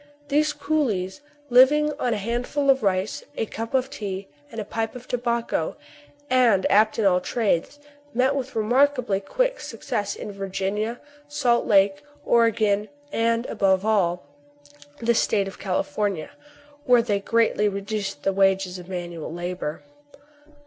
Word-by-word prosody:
These 300 +1 +2
coolies, 285 -9 -1 0.3
living 295 +5 +6
on 245 - 0
a 220 - 0
hand 235 +4 -2
ful 280 -1 +2
of 265 -1 +1
rice, 190 0 0
a - - 0
cup 225 +3 -5
of 265 +1 +1
tea, 200 -7 -5 0.2
and 225 - -6
a 210 - -4
pipe 225 +2 -3
of 250 0 -10
tobacco, 235 -1 -1 0.5
and 245 -7 +3
apt 215 +1 +4
at 220 - +1
all 180 -2 +4
trades, 220 - -1 0.3
met 260 +2 +2
with 265 -1 -4
remarkably 245 -1 +2
quick - - -1
suc - - -9
cess 205 -4 -2
in - - -7
Virginia, 195 +4 -3 0.3
Salt 270 -5 +1
Lake, 195 -2 +4 0.2
Oregon, 215 -3 +2 0.2
and, 230 0 +1
above 195 -3 +1
all, 180 -6 +1 0.7
the 235 0 +1
State 205 -3 +1
of 195 - -9
California, 195 - -2 0.5
where 245 -3 +5
they 205 -4 0
greatly 215 0 +2
reduced 200 -4 -4
the 195 - +1
wages 190 -1 +2
of 180 +1 -12
manual 175 -4 -5
labor. 175 -2 -4
215 Hz, 145 wpm, -24 LUFS, 195-245 Hz, 0.7 s, living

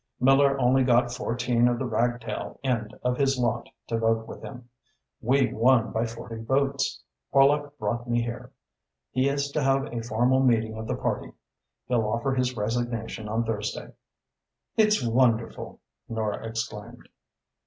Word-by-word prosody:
Miller 135 +1 +4
only 130 +1 +4
got 120 -1 +3
fourteen 120 0 +1
of 120 -1 +1
the 130 - -2
ragtail 120 -1 -2
end 120 -4 -1
of 125 0 0
his 135 -1 +2
lot 120 -1 -1 0.2
to 115 - -2
vote 115 0 +1
with - - -9
him. 125 -2 -9 0.5
We 130 +3 +2
won 120 0 +3
by 115 +1 0
forty 115 0 -8
votes. 135 +3 0 0.3
Horlock 145 +1 +3
brought 120 -2 -3
me 120 0 +2
here. 125 +1 -6 0.6
He 130 +2 +2
is 140 0 -1
to 150 - -1
have 135 0 +1
a 115 - -2
formal 120 +3 +2
meeting 115 -4 +2
of 110 0 -6
the - - -1
party. - - -3 0.5
He'll 115 -3 +1
offer 120 +5 0
his 130 -1 0
resignation 115 0 -2
on 115 +2 0
Thursday." 110 -2 -4 0.8
"It's 215 - +3
wonderful!" 115 -1 +1 0.3
Nora 110 -1 -2
exclaimed. 110 +1 -6
120 Hz, 150 wpm, -26 LUFS, 115-130 Hz, 0.8 s, Miller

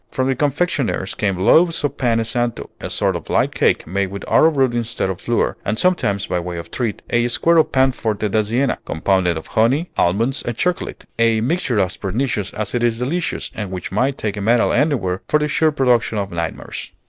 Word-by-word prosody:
From 130 0 -1
the 135 - +1
confectioners 145 - -1
came 100 -3 -1
loaves 160 - +4
of 145 - -1
pane 115 -3 +2
santo, 120 +1 -3
a - - -5
sort - - +1
of - - -7
light - - +1
cake - - +1
made 95 +3 -1
with 100 +1 -7
arrowroot 135 -6 +3
instead 115 -5 -1
of 95 - -7
flour; 120 - 0
and 110 +2 -1
sometimes, 105 - +1
by 90 - -1
way 85 0 -5
of 85 - -8
treat, 115 -5 -3
a 120 0 +2
square 165 +7 +3
of 160 - +3
pan 130 0 +3
forte 110 -3 -2
da 110 +2 +2
Siena, 120 +6 0
compounded 90 0 0
of 80 - -7
honey, 130 +10 +1
almonds, 115 +10 +1
and 120 -2 -4
chocolate, 180 -1 -2
a 115 -1 +3
mixture 130 - 0
as 95 -1 0
pernicious 105 0 -2
as 105 -1 -3
it 120 - 0
is 120 -1 +1
delicious, 155 +8 -2
and 105 -3 -5
which 90 -2 -6
might 130 +7 0
take 105 -2 -3
a - - -3
medal 115 +3 +3
anywhere 120 - +1
for 150 - +3
the 150 0 0
sure 155 +2 +2
production 125 -6 +1
of 100 -1 -3
nightmares. 85 -1 -5
115 Hz, 205 wpm, -20 LUFS, 100-135 Hz, -, loaves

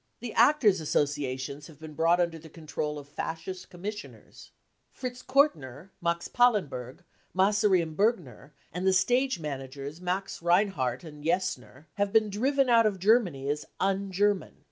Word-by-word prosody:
The 235 -1 -6
Actors' 230 - +4
Associations 140 -1 -2
have 160 - -15
been 155 0 -10
brought 165 +3 +3
under 170 -2 0
the 160 +1 -13
control 150 -1 -4
of 145 -1 -9
Fascist 165 +5 -6
commissioners. 205 +4 -9 0.4
Fritz 250 -1 -6
Kortner, 175 - +1
Max 170 0 -1
Pallenberg, 185 - +1 0.3
Massary 195 -1 +3
and 160 -1 -7
Bergner, 180 - -1 0.2
and 180 +3 -2
the 190 - +4
stage 245 +2 +2
man 145 -4 -4
agers 140 +4 -8
Max 185 +1 -3
Reinhardt 170 - +1
and 150 -3 -11
Jessner, 160 - -2
have 200 0 0
been 215 -1 +3
driven 270 +6 +1
out 230 -2 +5
of 200 -2 -2
Germany 185 - +2
as 145 +1 -1
cc - - -21
un 195 0 0
German." 205 +1 0
180 Hz, 155 wpm, -28 LUFS, 150-205 Hz, 0.4 s, out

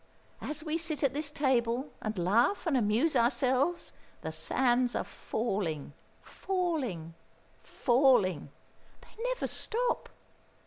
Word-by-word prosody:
As 300 0 -4
we 320 +1 -1
sit 315 -3 -2
at 270 -2 +2
this 295 +1 -1
table 260 -2 0
and 215 -1 -3
laugh 220 - +2
and 325 -5 +1
amuse 245 +7 +2
ourselves, 260 +7 +2 0.3
the - - -3
sands 245 -1 +1
are - - 0
falling, 190 - -3 0.3
falling, 295 - -2 0.5
falling 240 - +2 0.5
they 455 - -11
never - - -1
stop! 480 +2 -1
260 Hz, 110 wpm, -30 LUFS, 225-310 Hz, 0.5 s, at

